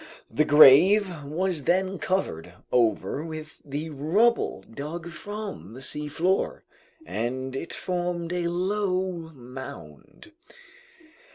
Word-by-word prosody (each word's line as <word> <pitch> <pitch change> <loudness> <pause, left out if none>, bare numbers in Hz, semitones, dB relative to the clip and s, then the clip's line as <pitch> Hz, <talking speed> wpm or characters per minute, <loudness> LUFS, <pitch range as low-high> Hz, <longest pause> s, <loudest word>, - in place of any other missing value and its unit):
The 155 - +2
grave 155 +5 +7
was 160 +1 -2
then 190 +1 +1
covered 90 - -2 0.2
over 125 +4 +1
with 155 -1 -8
the 150 +3 -5
rubble 190 +12 +1
dug 155 +7 -7
from 200 - -7
the - - -8
seafloor, 150 +7 -1 0.4
and 130 - -3
it 165 - -4
formed 175 -1 -2
a 175 -1 0
low 185 +1 0 0.2
mound. 125 - -11
160 Hz, 100 wpm, -26 LUFS, 135-185 Hz, 0.4 s, grave